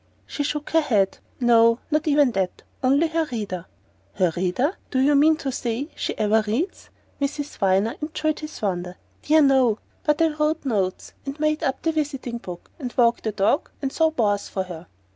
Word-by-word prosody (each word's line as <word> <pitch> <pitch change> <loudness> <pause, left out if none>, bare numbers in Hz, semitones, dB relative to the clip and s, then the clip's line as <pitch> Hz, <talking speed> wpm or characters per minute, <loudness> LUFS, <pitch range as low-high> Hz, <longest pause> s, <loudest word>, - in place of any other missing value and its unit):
She - - -4
shook 295 +1 -3
her 325 - +4
head. 200 -9 +1 0.2
"No; 230 -2 +5
not 305 +1 +1
even 290 -3 +4
that. 190 -4 -2 0.2
Only 280 +5 +4
her 325 0 0
reader." 200 -6 -4 0.5
"Her 180 -4 +2
reader? 190 - 0
Do 265 - -2
you 275 +3 +4
mean 305 +3 +5
to 275 -3 -4
say 245 +4 -3
she - - -3
ever 215 +1 +3
reads?" 270 - -2 0.3
Miss 280 +1 -1 0.2
Viner 195 +3 +2
enjoyed 310 0 -1
his 305 0 -8
wonder. 180 -2 -2 0.2
"Dear, 310 +1 +4
no! 260 -5 +4 0.3
But 300 -1 +2
I 325 - +4
wrote 305 0 -1
notes, 195 -7 -1
and 275 +2 -6
made 305 0 +1
up 270 -4 -2
the 325 - +2
visiting 275 -6 -3
book, 180 -5 -9
and 250 -4 -4
walked 235 -2 +3
the 220 - 0
dogs, 210 +6 +1
and 270 -2 -3
saw 320 -1 +3
bores 205 -9 0
for 190 - -2
her." 175 -2 -9
260 Hz, 185 wpm, -23 LUFS, 210-300 Hz, 0.5 s, No